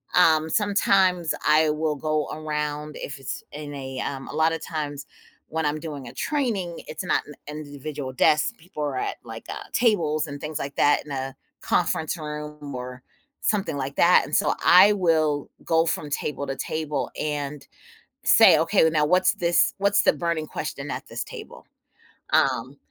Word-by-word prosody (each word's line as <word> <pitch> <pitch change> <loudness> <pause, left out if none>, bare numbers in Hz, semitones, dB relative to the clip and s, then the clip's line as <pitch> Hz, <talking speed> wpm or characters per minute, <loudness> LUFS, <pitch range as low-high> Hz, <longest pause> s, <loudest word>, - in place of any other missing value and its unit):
um, 160 -3 +5
sometimes 190 -4 +2
I 155 +1 +5
will 155 0 -1
go 155 0 -1
around 150 -1 -3
if 140 - -6
it's 135 - -5
in 145 0 -7
a, 130 -1 -6
um 135 -1 -4
a - - -7
lot 160 +2 +2
of 165 - -4
times 145 -3 -4 0.4
when 160 -1 -2
I'm 150 +1 0
doing 145 -5 -7
a - - -9
training, 220 - -2
it's 155 +4 -5
not - - +2
n 150 - -10 0.3
individual 145 -1 -6
desk. 150 - +3
People 165 -4 -7
are 140 -3 -2
at, - - -2
like, - - -9
uh, - - -5
tables 165 -10 +2
and 145 0 -7
things 155 0 -4
like 140 0 -5
that 145 - +3
in 150 - -10
a 135 0 -4 0.3
conference 160 +2 0
room 150 -2 -7
or 125 0 -7 0.4
something 195 -8 0
like 140 +1 -4
that, 175 +1 +6
and - - -2
so 205 - +3
I 195 +4 +8
will 155 -6 +1 0.2
go 165 0 +3
from 150 -2 -2
table 140 0 -3
to 135 - -3
table 150 -5 -3
and 145 -1 -3 0.6
say, - - +7
"Okay, 160 - +3
now, 150 -2 +2
what's 185 +3 +3
this 170 0 +2
what's 200 +1 +3
the - - +5
burning 170 -2 -2
question 145 -2 -5
at - - -5
this - - -4
table?" - - -11 0.7
Um, 130 +1 +1
150 Hz, 175 wpm, -25 LUFS, 145-165 Hz, 0.7 s, I